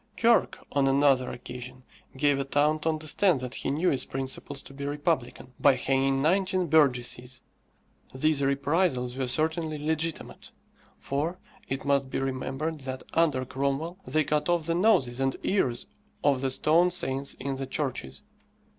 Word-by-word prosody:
Kirke, 235 0 +3
on 140 -1 +2
another 135 -2 +3
occasion, 125 +1 -8 0.3
gave 145 0 +2
a - - 0
town 145 +3 +1
to 160 - 0
understand 155 +1 +2
that 125 0 -5
he - - -3
knew 160 +6 +1
its 135 - +1
principles 135 +1 -3
to - - -12
be 140 +1 -7
republican, 145 -3 -2
by 140 -2 +5
hanging 135 +1 +1
nineteen 185 +2 +2
burgesses. 125 -5 +1 0.7
These 145 +2 +1
reprisals 140 -2 +1
were 130 -1 -2
certainly 155 +3 0
legitimate, 160 +2 -3 0.5
for 155 +6 -2 0.3
it 135 0 -4
must 140 -1 +1
be - - -3
remembered 135 +4 -3
that, 130 -1 -6
under 150 -6 +2
Cromwell, 140 +7 -2
they 155 +4 +1
cut 150 +2 0
off 175 -2 +1
the 165 - 0
noses 165 - +2
and 135 0 0
ears 125 -12 0 0.4
of 140 -3 +3
the 135 - 0
stone 160 +6 +3
saints 135 -6 -1
in 135 0 -4
the 135 0 -4
churches. 130 - -4
140 Hz, 155 wpm, -27 LUFS, 130-155 Hz, 0.7 s, by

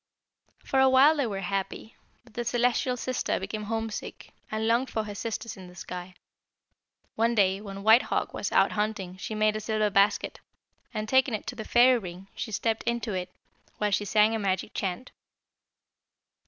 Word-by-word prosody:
"For 270 - +1
a 265 0 +6
while 270 +4 +6
they 280 -5 0
were 195 -3 -4
happy, 195 +3 -4 0.3
but 235 -2 -21
the 240 - -3
'Celestial 245 +1 +1
Sister' 255 0 -1
became 210 +2 -5
homesick, 225 0 -5 0.2
and 220 +1 -1
longed 240 +3 +2
for 220 - -2
her 210 -1 -6
sisters 225 +1 -5
in 185 -1 -10
the 180 - -14
sky. 180 0 -7 1.0
One 230 +1 +1
day 195 -2 +3
when 195 -1 -8
White 220 +3 +7
Hawk - - -2
was - - -3
out - - +4
hunting 210 -4 -2
she 215 - -5
made 215 0 +2
a - - -1
silver 215 -1 0
basket 200 0 +2 0.5
and, 215 0 -4
taking 260 -1 +3
it 210 - -6
to - - -5
the 220 - -5
fairy 245 +1 +5
ring, 185 -1 -9
she 220 - -5
stepped 220 +1 0
into 235 -2 -1
it, 180 -1 -3 0.5
while 210 -1 0
she 205 - +1
sang 215 +2 +4
a 225 - -1
magic 195 0 -1
chant. 195 +5 -3
215 Hz, 180 wpm, -27 LUFS, 195-235 Hz, 1.0 s, White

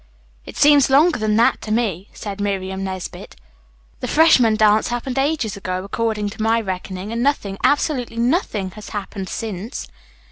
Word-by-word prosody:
"It - - -9
seems 290 -2 +5
longer 300 +3 +4
than 215 -1 +1
that 230 +2 +3
to 215 - -6
me," 210 -5 -1
said 205 -1 -7
Miriam 190 -1 -2
Nesbit. 190 -1 -6 0.6
"The - - -4
freshman 260 -8 +5
dance 215 0 +4
happened 250 +2 -3
ages 275 -7 0
ago, 185 -2 -4
according 210 0 -2
to 215 - -8
my 225 +1 +2
reckoning, 190 0 -5
and 230 +1 -2
nothing, 225 -8 0
absolutely 265 -5 +1
nothing, 235 - 0
has 210 +2 -10
happened 195 -2 -5
since." 215 0 -5
215 Hz, 155 wpm, -20 LUFS, 195-245 Hz, 0.6 s, seems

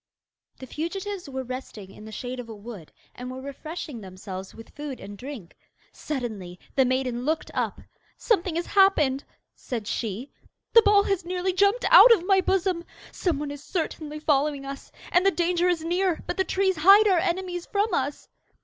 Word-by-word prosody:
The 260 - -9
fugitives 360 +5 -5
were 265 -1 -4
resting 245 -6 -8
in 210 - -13
the 220 - -9
shade 250 +3 -5
of 240 -2 -7
a 220 - -7
wood, 205 -6 -10 0.2
and 250 +1 -7
were 255 +1 -6
refreshing 280 -1 -7
themselves 190 0 -8
with 225 - -12
food 290 -3 -6
and 205 +1 -9
drink. 245 -6 -9 0.4
Suddenly 215 -11 -5 0.2
the 265 - +4
maiden 255 -1 -1
looked 315 +4 -1
up. - - -2 0.4
'Something 370 -7 +1
has 340 +1 -1
happened,' 305 -9 +3 0.3
said 235 -5 -5
she. 225 +5 -4 0.4
'The 460 - +9
ball 410 -1 +5
has 390 -3 -1
nearly 365 +1 -1
jumped 400 +6 +2
out - - +10
of 360 -7 +4
my 385 0 +4
bosom! 370 -2 0 0.3
Some 345 -6 -1
one 290 0 -4
is 290 0 -9
certainly 310 -3 -4
following 290 -2 +1
us, 275 0 -8 0.2
and 355 - +4
the 390 - +5
danger 355 -1 +1
is 340 -3 0
near, 355 0 0
but - - -3
the 380 - +1
trees 380 -2 +1
hide 395 +7 +7
our 370 -4 +4
enemies 355 0 -2
from 410 0 0
us. 280 -1 -2
305 Hz, 180 wpm, -26 LUFS, 255-370 Hz, 0.4 s, out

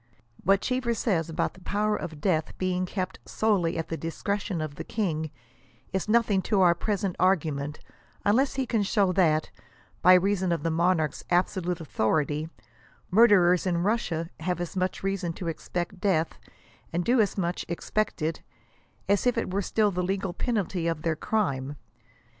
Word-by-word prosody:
What 195 +2 +4
Gheever 250 -2 0
says 170 -7 0
about 160 - -1
the 185 - -17
power 210 +3 0
of 160 -6 -6
death 155 -2 0
being 185 0 -1
kept 185 0 -4
" - - -37
solely 195 -6 +2
at 165 - -3
the 165 - -2
discretion 190 +3 -3
of 155 -2 -3
the - - -6
king" 160 -8 -2 0.6
is 190 +2 -1
nothing 220 -4 +3
to 205 -3 +3
our 175 -2 +6
present 195 0 -2
argument, 155 -6 +1 0.5
unless 260 +7 +3
he 265 -1 0
can 230 -3 0
show 200 -1 +2
that, 160 -4 +2 0.5
by 185 +1 +8
reason 190 0 +2
of 170 - -1
the 165 - 0
monarcli's 165 -2 +1
absolute 180 0 +1
authority, 150 +2 0 0.6
murderers 185 -4 +5
in 170 -1 +1
Russia 175 -6 -1
have 175 +2 -2
as 175 +1 -4
much 185 0 -1
reason 195 -3 -1
to 175 - -6
expect 175 +3 -4
death, 165 -5 +1 0.5
and 175 +1 -1
do 245 -1 +4
as 205 - 0
much 175 -2 -1
expect 180 +1 -2
it, 160 +1 -1 0.7
as 200 +5 +2
if 245 - +2
it 185 - -2
were 200 - +1
still 210 +2 +1
the 180 -1 -1
legal 190 0 -2
penalty 195 -8 -1
of 165 -2 -2
their 165 -1 +1
crime. 145 -9 -1
180 Hz, 170 wpm, -27 LUFS, 165-200 Hz, 0.7 s, by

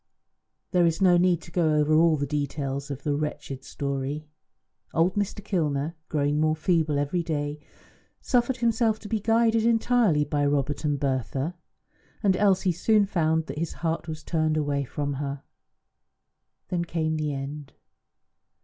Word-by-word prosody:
There 175 -2 +4
is 165 -1 0
no 185 -2 +5
need 175 -1 +3
to 170 - -13
go 165 -3 +2
over 150 +1 +2
all 160 0 +5
the 145 - -1
details 140 -1 -3
of 140 -1 -6
the 145 - 0
wretched 145 -3 -4
story. 140 +2 -3 0.7
Old 170 +3 +3
Mr. 205 0 -3
Kilner, 155 -5 -1 0.2
growing 145 -1 +1
more 155 0 +2
feeble 160 -2 +1
every 145 +5 0
day, 150 -2 -3 0.6
suffered 245 0 +1
himself 230 -2 +2
to 210 - -8
be 220 0 -1
guided 225 +1 +3
entirely 225 -8 +3
by 145 0 0
Robert 145 +1 0
and 145 -2 0
Bertha, 135 +3 -1 0.7
and 195 -2 +4
Elsie 190 -1 +3
soon 205 +5 +3
found 160 -4 +1
that 150 - -6
his 165 -1 -2
heart 165 0 -1
was 155 -1 -6
turned 155 -2 0
away 145 -2 0
from 145 +2 -3
her. 140 -1 -4 1.3
Then 175 -2 0
came 160 -2 -1
the 155 -1 -1
end. 140 +1 -6
155 Hz, 155 wpm, -26 LUFS, 145-180 Hz, 1.3 s, no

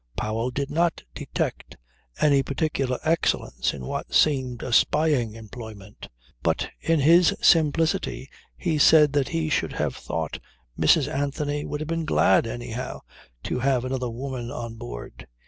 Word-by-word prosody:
Powell 110 +3 -1
did 140 +2 -3
not 170 +1 0
detect - - -4 0.4
any 140 -2 +4
particular 135 -2 -1
excellence 165 +1 0
in 65 -3 -8
what - - -4
seemed 130 -5 +2
a 125 - -3
spying 145 -7 +2
employment. 110 -2 -10 0.3
But - - 0
in 165 -2 +1
his 165 +3 +5
simplicity 160 -2 +2 0.3
he 165 -4 -1
said 150 -1 +6
that 140 -2 +1
he 165 -1 -1
should 155 - 0
have - - -2
thought 80 -2 -4 0.4
Mrs. 130 - +4
Anthony 145 0 -2
would 150 - -4
have 155 - -4
been 165 0 -2
glad 115 -7 +3
anyhow 120 +1 -5 0.4
to - - -2
have 130 -1 +1
another 130 -1 -2
woman 125 0 -5
on 115 -2 -6
board. - - -9
135 Hz, 145 wpm, -25 LUFS, 120-155 Hz, 0.4 s, said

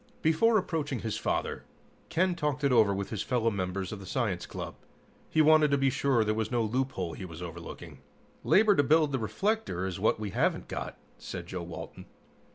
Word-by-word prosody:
Before 190 +9 +4
approaching 150 - -2
his 110 -2 -2
father, - - -2 0.5
Ken 180 +3 +2
talked 150 -3 -2
it 140 - +3
over 110 -5 +5
with 100 0 -3
his 110 - -2
fellow 115 -3 +1
members 95 -1 -3
of 105 - -6
the 95 - -10
science 105 -10 -1
club. - - -6 0.6
He 155 - +4
wanted 155 0 +6
to 140 - +3
be 135 -1 +2
sure 135 -3 +2
there 110 0 +1
was 110 0 -1
no 120 -2 +1
loophole 115 -6 -2
he - - -7
was 85 -1 -8
overlooking. 85 -1 -9 0.4
"Labor 210 0 +5
to - - +5
build 150 +1 +3
the 135 - 0
reflector 195 - -1
is 95 0 -4
what 105 +1 +2
we 105 -2 -4
haven't - - 0
got," - - -5 0.2
said - - -6
Joe - - -5
Walton. - - -8
125 Hz, 195 wpm, -29 LUFS, 100-150 Hz, 0.6 s, wanted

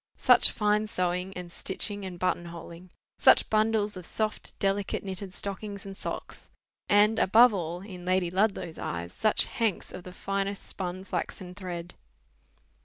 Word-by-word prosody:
Such - - +6
fine 210 0 +1
sewing, 180 -1 -1
and 180 -1 -7
stitching, 200 +2 -1
and 180 -2 -6
button 175 -1 0
holing! 170 +1 -10 0.3
Such - - +5
bundles 215 -1 +2
of 180 -2 -4
soft 215 -1 -1
delicate 195 0 0
knitted 190 0 -5
stockings 200 +1 -6
and 195 0 -7
socks; - - -6 0.4
and, 210 +2 +5
above 225 +4 +6
all, 175 -2 -3
in 185 -3 -9
Lady 185 -1 +1
Ludlow's 185 -4 0
eyes, 85 +1 -4
such 215 -1 +2
hanks 225 -6 -2
of 185 - -7
the 180 - -9
finest 195 +1 -3
spun 185 0 -5
flaxen 185 -1 -4
thread! 175 -3 -6
190 Hz, 150 wpm, -28 LUFS, 180-205 Hz, 0.4 s, Such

